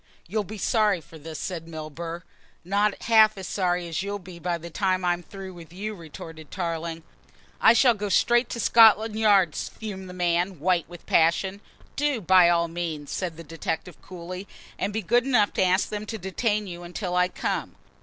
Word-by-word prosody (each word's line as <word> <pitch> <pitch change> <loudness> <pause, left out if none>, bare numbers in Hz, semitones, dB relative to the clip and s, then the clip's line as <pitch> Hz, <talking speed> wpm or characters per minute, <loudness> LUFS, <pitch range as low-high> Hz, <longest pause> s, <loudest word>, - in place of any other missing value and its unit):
"You'll 210 +4 -1
be 215 +3 -8
sorry 210 -2 +2
for 160 0 -14
this," 155 +1 -8
said 165 -3 -5
Milburgh. 165 +2 -6 0.4
"Not 200 +2 +1
half 220 -2 +5
as 190 - -6
sorry 180 -2 0
as 165 0 -2
you'll 200 +1 -3
be 180 -2 -12
by 175 0 -1
the 170 +1 -10
time 185 0 0
I'm 175 0 +1
through 190 +1 -9
with 170 -2 -12
you," 205 +4 -5
retorted 160 -3 -10
Tarling. 165 -2 -4 0.6
"I - - +8
shall 240 +1 +5
go 205 -1 -4
straight 240 +4 +3
to 235 - -4
Scotland 220 -1 +6
Yard," 200 -7 +4
fumed 190 -4 -6
the 180 - -9
man, 175 0 0
white 175 0 +1
with 175 -1 -12
passion. 190 +5 +2 0.3
"Do, 290 -3 +1
by 185 -2 +6
all 170 -1 +2
means," 165 -3 -5
said 175 -4 -3
the 165 - -8
detective 165 +1 -5
coolly, 185 +2 -8 0.3
"and 205 - -1
be 220 +1 -3
good 240 +6 +3
enough 245 -6 +2
to - - +2
ask 185 +1 +2
them 210 0 -5
to 220 - -4
detain 210 +3 -1
you 175 -2 -7
until 180 +1 -4
I 180 0 +4
come." - - -3
185 Hz, 190 wpm, -25 LUFS, 170-210 Hz, 0.6 s, I